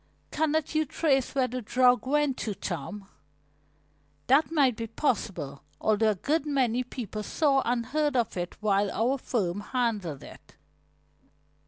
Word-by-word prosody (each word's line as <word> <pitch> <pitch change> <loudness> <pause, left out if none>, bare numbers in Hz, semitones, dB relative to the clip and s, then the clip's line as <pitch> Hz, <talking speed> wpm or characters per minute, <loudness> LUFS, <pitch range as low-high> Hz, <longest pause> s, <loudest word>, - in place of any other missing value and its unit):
"Cannot 315 0 0
you 310 0 +3
trace 275 -3 0
where 260 -2 +2
the 255 0 -4
drug 250 +1 +3
went 295 -1 +2
to, 210 -3 -3
Tom?" 195 +3 -5 1.2
"That 285 +5 +4
might 275 -7 +3
be 230 +1 -4
possible, 200 - -2 0.2
although 215 0 +2
a 210 - +1
good 290 - 0
many 255 -4 +1
people 225 -4 -6
saw 275 +4 +2
and 235 -1 0
heard 295 +2 0
of 240 -3 0
it 175 -1 -4
while 200 -1 +2
our 250 +8 0
firm 200 -8 -1
handled 210 - -2
it." - - -14
245 Hz, 145 wpm, -28 LUFS, 210-275 Hz, 1.2 s, That